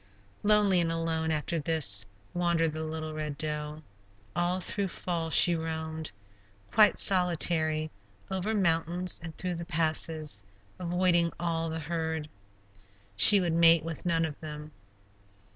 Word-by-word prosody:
Lonely 205 -3 +3
and 165 -1 -1
alone, 165 -1 -2
after 160 +2 -2
this, 135 -11 +3 0.3
wandered 170 -2 0
the 155 0 -5
little 155 0 -6
Red 150 -2 -5
Doe; 150 0 -4 0.5
all 175 +1 -1
through 200 +2 -3
fall 170 -2 -4
she 170 +1 +6
roamed, 160 -1 -5 0.6
quite 215 -1 +4
solitary, 165 -4 +3 0.4
over 190 +4 -2
mountains 175 -1 0
and 165 -1 -9
through 180 -1 -4
the 170 0 -7
passes, 155 - -2 0.4
avoiding 175 -1 +1
all 165 -1 -2
the 160 0 -5
herd; 160 -1 -4 0.9
she 200 - +8
would 175 -3 -1
mate 165 -1 +5
with 165 -2 -7
none 165 -2 0
of 150 -2 -8
them. 150 -1 -9
165 Hz, 130 wpm, -28 LUFS, 155-175 Hz, 0.9 s, she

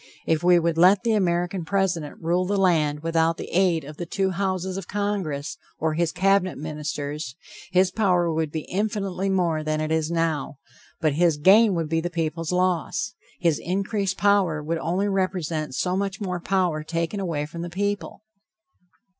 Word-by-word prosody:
If 160 0 +1
we 180 0 +6
would 165 -1 +1
let 185 +4 +6
the 230 -2 +2
American 175 -2 0
President 175 -4 -1
rule 175 +2 0
the 200 +1 0
land 155 -6 +2
without 165 0 +1
the - - -7
aid 175 -3 +2
of 150 +2 -10
the 175 - -5
two 190 +2 0
houses 185 0 -2
of 195 -3 -5
congress 195 -8 -2 0.2
or 160 0 0
his 165 +1 0
cabinet 195 -1 +2
ministers, 150 -2 -4 0.4
his 185 0 +3
power 180 -5 +2
would 160 -1 -1
be 160 - -3
infinitely 195 0 -2
more 170 -5 +1
than 155 0 -1
it 155 0 -2
is 160 -1 +1
now, 165 -4 -1 0.4
but 155 -3 +2
his 165 0 +3
gain 195 +6 +6
would 165 -2 -1
be 165 +1 0
the 175 - -2
people's 165 -1 -2
loss. 180 +5 0 0.3
His 170 -4 +2
increased 195 +2 -1
power 195 -7 +2
would 165 +2 -2
only 180 +5 0
represent 180 -7 -1
so 180 0 0
much 195 0 -2
more 185 -4 -3
power 175 -4 0
taken 165 +5 -2
away 165 -6 -2
from 165 +3 -8
the 175 - -4
people. 205 +3 -3
175 Hz, 175 wpm, -24 LUFS, 160-190 Hz, 0.4 s, we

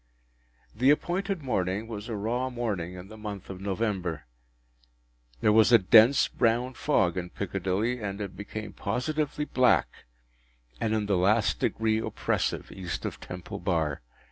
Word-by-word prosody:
The 125 +5 +3
appointed 180 +3 +1
morning 100 -3 -1
was 110 0 -7
a 115 - -2
raw 120 +5 -1
morning 105 -8 -3
in 90 +1 -9
the 110 +1 -12
month 105 -3 -6
of 95 0 -8
November. 95 - -2 1.2
There 105 - +4
was 110 +2 +5
a 120 - +9
dense 115 +6 +6
brown 120 +3 +1
fog 95 - +1
in 90 -1 -3
Piccadilly, 100 +6 -2
and 100 -1 -4
it 100 -3 -5
became 105 0 -7
positively 150 +9 -2
black 130 - +2 0.7
and 110 0 0
in 105 -1 0
the 100 -2 +1
last 100 +4 +2
degree 110 0 +1
oppressive - - -2
East 90 -3 -5
of - - -4
Temple 90 -1 -7
Bar. 80 -5 -1
105 Hz, 145 wpm, -28 LUFS, 95-120 Hz, 1.2 s, a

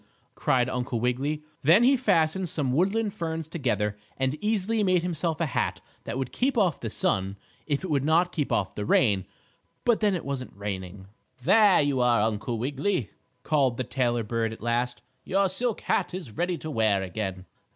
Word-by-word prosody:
cried 125 -2 +1
Uncle 125 -2 -2
Wiggily. 135 +6 -1 0.2
Then 170 - +6
he 270 +3 +6
fastened 180 -7 +1
some 145 -7 -1
woodland 200 +7 +1
ferns 165 -4 -4
together 105 - -1 0.2
and 130 0 0
easily 215 +1 +1
made 185 -4 +2
himself 170 -2 -1
a 165 - +1
hat 135 - -1 0.3
that 115 - -4
would 135 -2 -3
keep 260 0 0
off 185 -9 +2
the 115 - -4
sun, 95 -1 -1 0.3
if 145 +2 -1
it 190 - -4
would 140 -2 +2
not 165 +4 +3
keep 150 -5 -2
off 95 - 0
the 105 - -4
rain. 100 -3 +2 0.6
But 235 -2 +3
then 205 -3 +2
it 175 - -5
wasn't 135 -6 -5
raining. 95 -1 -5 0.4
"There 205 - +6
you 140 -3 +1
are, 120 -3 +4
Uncle 110 +2 -1
Wiggily!" 135 - -1 0.3
called 135 -6 +2
the 130 - -1
tailor 120 -2 0
bird 115 +1 -1
at 110 - -11
last. 120 +1 -1 0.2
"Your 195 +1 +2
silk 225 +5 -1
hat - - 0
is 170 -11 -7
ready 175 +3 -1
to 155 +1 -6
wear 110 -6 +2
again." 95 -1 -4
140 Hz, 180 wpm, -27 LUFS, 115-180 Hz, 0.6 s, Then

